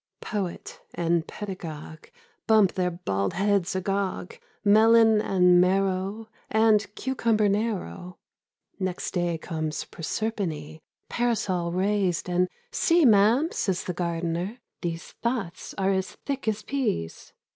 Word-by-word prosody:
Poet 195 -5 -5
and 170 -1 0
pedagogue 165 -6 -7 0.4
Bump 215 -4 +5
their 180 -1 0
bald 100 - -2
heads 195 0 +1
agog 195 -1 -2 0.2
— - - -39
(Melon 220 +1 +6
and 180 -3 +4
marrow. 195 +3 0 0.2
And 220 -1 +3
cucumber 230 -5 +1
narrow). 195 - -2 0.6
Next 185 -2 -3
day 175 -2 0
comes 155 -2 -4
Proserpine, 165 -5 -4 0.3
Parasol 195 -8 0
raised, 190 -1 0
and 180 0 +1
' 485 - -40
See, 335 -2 +4
Ma'am,' 225 +7 +5
says 185 -2 -1
the 180 - -3
gardener, 170 +4 -2
' - - -57
these 170 -2 -4
Thoughts 235 -8 -3
are 195 0 +2
as 190 -1 0 0.2
thick 275 -4 -3
as 215 -1 0
peas 220 - -3
190 Hz, 125 wpm, -26 LUFS, 175-215 Hz, 0.6 s, Melon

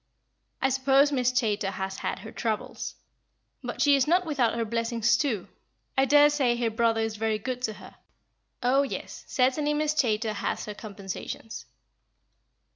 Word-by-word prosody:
I 265 - +4
suppose 270 +2 +4
Miss 255 -3 +2
Chaytor 215 -6 0
has 190 0 -4
had - - -2
her 220 - -9
troubles, 220 -2 -3 0.7
but - - -2
she 285 -1 +6
is 275 0 +2
not 360 +3 +3
without 265 -8 +1
her 230 -1 -1
blessings, 230 +1 +1
too. 235 -9 -1 0.5
I 265 0 +4
daresay 290 -3 +4
her 235 -1 0
brother 225 0 +2
is 225 -1 -2
very 220 0 0
good 250 +3 -4
to 220 -4 -1
her. - - -14 0.7
Oh, 260 +3 +4
yes, 280 - -5
certainly, 290 +3 +1
Miss 305 0 +1
Chaytor 225 -6 +1
has 200 - -3
her 210 - -5
compensations." 205 +1 -7
240 Hz, 155 wpm, -27 LUFS, 220-275 Hz, 0.7 s, she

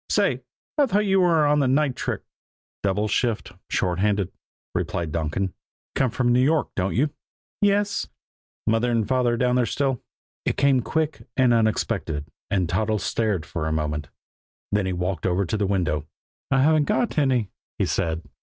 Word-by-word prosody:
"Say, - - +2 0.4
I 285 - +5
thought 210 -2 +2
you 195 -1 +3
were 165 -4 +4
on 150 0 +3
the 140 - +3
night 135 0 +2
trick." - - -3 0.6
"Double 100 +2 +1
shift 115 -2 0 0.2
short 90 -1 0
handed," 100 -2 +1 0.4
replied 85 -3 -2
Donkin. 85 +4 -1 0.4
"Come 135 -2 +2
from 120 +1 +1
New 125 - +4
York, 155 +3 +2
don't 95 0 0
you?" 145 +6 +2 0.5
"Yes," 205 0 +4
said 200 - -3
Toddles. - - -38 0.7
"Mother 120 0 +1
and 115 -3 +1
father 125 -2 +2
down 125 +1 +2
there 125 -2 +2
still?" 135 -4 0 0.4
It - - -1
came 140 -2 +4
quick 155 +6 -2
and 130 -2 +5
unexpected, 110 -9 0 0.2
and 95 -4 +1
Toddles 105 +5 0
stared 105 -8 0
for 80 -1 -3
a - - -1
moment. 75 -1 -2 0.6
Then 105 -2 +1
he 95 - -1
walked 90 +1 -1
over 95 +2 +1
to 90 - -2
the 105 -2 0
window. 80 -6 0 0.4
"I 135 -1 +3
haven't 155 0 +4
got 215 -2 +1
any," 125 -8 +1 0.3
he - - +1
said. 80 0 -1
115 Hz, 175 wpm, -24 LUFS, 90-140 Hz, 0.7 s, I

